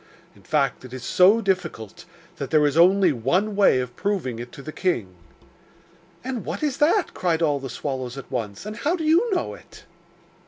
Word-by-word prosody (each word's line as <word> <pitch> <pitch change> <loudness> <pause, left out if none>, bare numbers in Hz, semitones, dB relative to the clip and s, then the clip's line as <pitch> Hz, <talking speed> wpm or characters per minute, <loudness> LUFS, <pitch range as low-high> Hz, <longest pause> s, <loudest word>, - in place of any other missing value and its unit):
In 100 - -19
fact, 140 +2 0
it 130 -1 -11
is 130 -2 -7
so 195 - +4
difficult 180 - -3 0.3
that 140 -4 -5
there 155 -2 +4
is 145 0 +1
only 185 +1 +5
one 175 - 0
way 195 -10 +4
of 125 -1 -5
proving 180 - -2
it 120 +1 -8
to 140 - -10
the 155 - -7
king.' 120 - -2 1.1
'And 255 -2 -4
what - - -5
is 285 -3 0
that?' 340 +6 +2
cried 170 -2 0
all 145 -3 +1
the 135 -1 -7
swallows 130 -2 -4
at 135 - -9
once. 115 - -4
'And 210 0 -6
how 305 +8 0
do 335 - -4
you 335 +10 +3
know 365 - -1
it? - - -15
160 Hz, 195 wpm, -23 LUFS, 130-210 Hz, 1.1 s, only